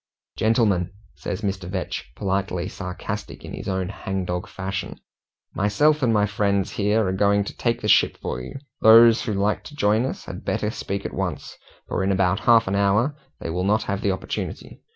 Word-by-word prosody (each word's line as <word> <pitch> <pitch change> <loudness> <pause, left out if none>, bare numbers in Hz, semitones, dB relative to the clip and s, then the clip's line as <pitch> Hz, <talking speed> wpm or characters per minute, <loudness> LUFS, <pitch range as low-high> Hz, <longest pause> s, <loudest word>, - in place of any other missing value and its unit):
"Gentlemen," 105 -5 +2 0.2
says 100 +1 -5
Mr. 95 -3 -3
Vetch, 95 -8 -4
politely 95 -2 -1
sarcastic 100 +3 -6
in - - -8
his - - -7
own 95 -1 -1
hangdog 95 -3 -3
fashion, 95 0 -5 0.5
"myself 150 +10 +2
and 120 -3 +3
my 105 -2 +3
friends 100 -2 0
here 105 +1 +1
are 95 - 0
going 100 +1 +3
to - - -7
take 120 -1 -1
the 105 - -2
ship - - +4
for 60 - -4
you. 60 - -9 0.3
Those 115 +1 +8
who 110 - -2
like 100 +2 0
to 150 - -10
join 110 -1 +2
us - - -6
had - - -8
better 105 - -1
speak 100 -2 -4
at - - -4
once, - - -4 0.3
for 95 - -1
in 95 - +1
about 95 0 +2
half 115 -1 +4
an 95 - -1
hour 105 +8 +2 0.3
they 80 - -4
will 90 +2 -1
not 105 +2 +2
have 100 -1 -3
the 100 - +1
opportunity." 95 - -5
100 Hz, 190 wpm, -23 LUFS, 95-110 Hz, 0.5 s, Those